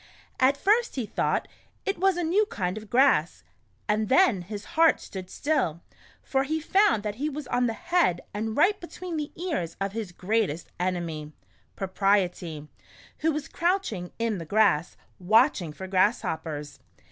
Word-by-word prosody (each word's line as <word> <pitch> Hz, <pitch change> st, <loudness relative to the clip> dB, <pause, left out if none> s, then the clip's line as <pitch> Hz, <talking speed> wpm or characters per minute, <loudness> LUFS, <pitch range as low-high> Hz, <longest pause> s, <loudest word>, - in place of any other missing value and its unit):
At 265 Hz, +2 st, +4 dB
first 435 Hz, +8 st, +2 dB
he 255 Hz, -4 st, -2 dB
thought 210 Hz, -, -1 dB, 0.4 s
't 395 Hz, -3 st, -1 dB
was 385 Hz, -1 st, +3 dB
a 350 Hz, -, -1 dB
new 390 Hz, +6 st, +2 dB
kind 180 Hz, -, -2 dB
of 215 Hz, -1 st, -9 dB
grass, 240 Hz, -, +3 dB, 0.4 s
and 215 Hz, 0 st, +1 dB
then 260 Hz, -, +4 dB
his 205 Hz, +3 st, -7 dB
heart 325 Hz, -1 st, +5 dB
stood 185 Hz, -2 st, -8 dB
still, 175 Hz, -, -1 dB, 0.4 s
for 270 Hz, 0 st, +1 dB
he 310 Hz, +3 st, -1 dB
found 310 Hz, -, +3 dB
that 210 Hz, 0 st, -4 dB
he 300 Hz, -, +1 dB
was 300 Hz, -1 st, -6 dB
on 245 Hz, 0 st, +2 dB
the 225 Hz, -, -1 dB
head 345 Hz, -, +1 dB
and 220 Hz, +1 st, -3 dB
right 385 Hz, +7 st, +4 dB
between 345 Hz, 0 st, -7 dB
the 300 Hz, -2 st, -3 dB
ears 315 Hz, -, -3 dB
of 195 Hz, 0 st, -1 dB
his 215 Hz, -3 st, -5 dB
greatest 185 Hz, -3 st, -1 dB
enemy 170 Hz, -4 st, -3 dB, 0.2 s
— -, -, -38 dB
Propriety, 185 Hz, -5 st, 0 dB, 0.5 s
who 320 Hz, +1 st, +2 dB
was 300 Hz, -1 st, -4 dB
crouching 340 Hz, -, -1 dB
in 230 Hz, -4 st, -1 dB
the -, -, -5 dB
grass, 190 Hz, -3 st, +2 dB, 0.2 s
watching 210 Hz, -, +3 dB
for 190 Hz, +5 st, -8 dB
grass 190 Hz, +4 st, +2 dB
hoppers 150 Hz, -2 st, -5 dB
220 Hz, 165 wpm, -27 LUFS, -, 0.5 s, heart